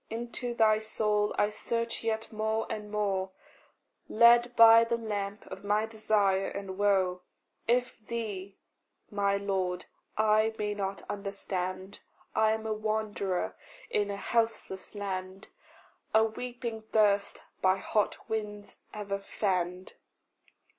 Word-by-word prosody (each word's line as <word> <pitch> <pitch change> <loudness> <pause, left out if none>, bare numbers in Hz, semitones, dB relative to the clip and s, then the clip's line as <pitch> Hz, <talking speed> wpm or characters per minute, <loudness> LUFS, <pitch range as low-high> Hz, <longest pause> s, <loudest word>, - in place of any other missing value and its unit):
Into 240 +1 -4
thy 215 -2 +4
soul 210 -1 +1
I 205 - +2
search 230 +2 -2
yet 225 0 -2
more 220 +1 0
and 210 -1 -5
more, 200 -3 0 0.8
Led 235 +2 +6
by 230 0 +9
the 230 0 0
lamp 205 -2 -4
of - - -9
my 210 +2 +2
desire 215 -3 +1
and 195 -1 -5
woe. 190 -2 +2 0.5
If 245 +1 +1
thee, 205 -5 -4 0.5
my 200 -1 +1
Lord, 190 -3 -1 0.3
I 215 +1 +3
may 210 0 -1
not 195 -1 -3
understand, 195 -1 -4 0.3
I 220 0 +3
am 220 0 -4
a 220 - 0
wanderer 210 - -1 0.4
in 205 -1 +1
a 200 - -3
houseless 225 -3 -1
land, 190 -1 -5 0.7
A 220 - +7
weeping 235 0 -4
thirst 205 -2 +3 0.2
by 185 0 +4
hot 210 +2 -1
winds 210 -2 -4 0.2
ever 200 -1 -3
fanned. 185 -2 -2
210 Hz, 120 wpm, -30 LUFS, 195-220 Hz, 0.8 s, by